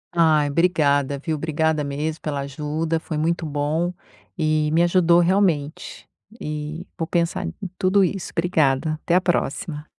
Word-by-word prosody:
Ai, 155 Hz, -3 st, +4 dB
obrigada, 145 Hz, -4 st, +2 dB
viu. 155 Hz, +3 st, -3 dB
Obrigada 160 Hz, 0 st, 0 dB
mesmo 150 Hz, +3 st, -3 dB
pela 145 Hz, -2 st, -3 dB
ajuda. 150 Hz, +4 st, -2 dB
Foi 160 Hz, -2 st, -5 dB
muito 165 Hz, +2 st, 0 dB
bom, 150 Hz, +4 st, -1 dB, 0.5 s
e 155 Hz, -1 st, +1 dB
me 165 Hz, +2 st, +4 dB
ajudou 175 Hz, -1 st, +4 dB
realmente, 175 Hz, -5 st, 0 dB, 0.3 s
e 150 Hz, +3 st, -5 dB
vou 165 Hz, -2 st, -2 dB
pensar 175 Hz, +2 st, 0 dB
em 175 Hz, -, -5 dB, 0.3 s
tudo 195 Hz, +1 st, +3 dB
isso. 190 Hz, 0 st, -2 dB
Obrigada, 155 Hz, -3 st, +1 dB
até 170 Hz, -, +1 dB
a 180 Hz, -, +5 dB
próxima. 160 Hz, -3 st, -2 dB
160 Hz, 145 wpm, -22 LUFS, 150-175 Hz, 0.5 s, a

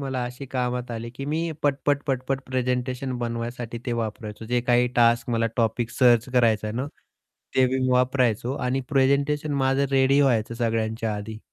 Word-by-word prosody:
मला 135 Hz, -2 st, -2 dB
अशी 125 Hz, +3 st, -7 dB
कामात 125 Hz, -1 st, -2 dB
आली 115 Hz, 0 st, -5 dB
की 125 Hz, +3 st, -7 dB
मी 165 Hz, +3 st, -1 dB
पट-पट, 145 Hz, 0 st, +1 dB
पट-पट 135 Hz, 0 st, -1 dB
प्रेझेंटेशन 125 Hz, 0 st, -1 dB
बनवायसाठी 120 Hz, 0 st, -4 dB
ते 120 Hz, -, -1 dB
वापरायचो. 110 Hz, 0 st, -6 dB
जे 120 Hz, +1 st, +1 dB
काही 120 Hz, 0 st, +3 dB
टास्क, 120 Hz, +1 st, +3 dB
मला 115 Hz, -1 st, +1 dB
टॉपिक 115 Hz, 0 st, 0 dB
सर्च 120 Hz, -1 st, +4 dB
करायचं 115 Hz, -4 st, +3 dB
आहे 105 Hz, -, -4 dB
ना, 130 Hz, -, -2 dB, 0.7 s
ते 130 Hz, -, +6 dB, 0.3 s
वापरायचो 125 Hz, -2 st, +2 dB
आणि 130 Hz, +2 st, 0 dB
प्रेझेंटेशन 140 Hz, +3 st, +2 dB
माझं 135 Hz, +1 st, +2 dB
रेडी 135 Hz, +1 st, +4 dB
व्हायचं 115 Hz, -4 st, +2 dB
सगळ्यांच्या 115 Hz, -1 st, -1 dB
आधी. 105 Hz, +1 st, -6 dB
125 Hz, 155 wpm, -25 LUFS, 115-135 Hz, 0.7 s, ते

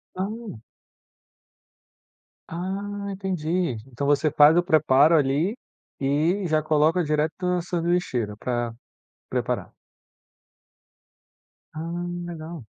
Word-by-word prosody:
Hum. 205 Hz, -, -5 dB, 1.9 s
Ah, 200 Hz, +3 st, -4 dB
entendi. 180 Hz, -5 st, -1 dB
Então 135 Hz, +2 st, -4 dB
você 145 Hz, +2 st, +3 dB
faz 150 Hz, +2 st, +6 dB
o 175 Hz, -, +4 dB
preparo, 155 Hz, -2 st, +5 dB
ali, 145 Hz, -, +1 dB, 0.4 s
e 155 Hz, +8 st, +1 dB
já 155 Hz, -1 st, +2 dB
coloca 155 Hz, +3 st, +2 dB
direto 150 Hz, +1 st, 0 dB
na 180 Hz, 0 st, +1 dB
sanduicheira 170 Hz, -, -1 dB
pra 120 Hz, -1 st, -2 dB, 0.6 s
preparar. -, -, -2 dB, 2.0 s
Ah, 170 Hz, +2 st, -4 dB, 0.2 s
legal. 165 Hz, -5 st, -7 dB
160 Hz, 90 wpm, -25 LUFS, 145-180 Hz, 2.0 s, faz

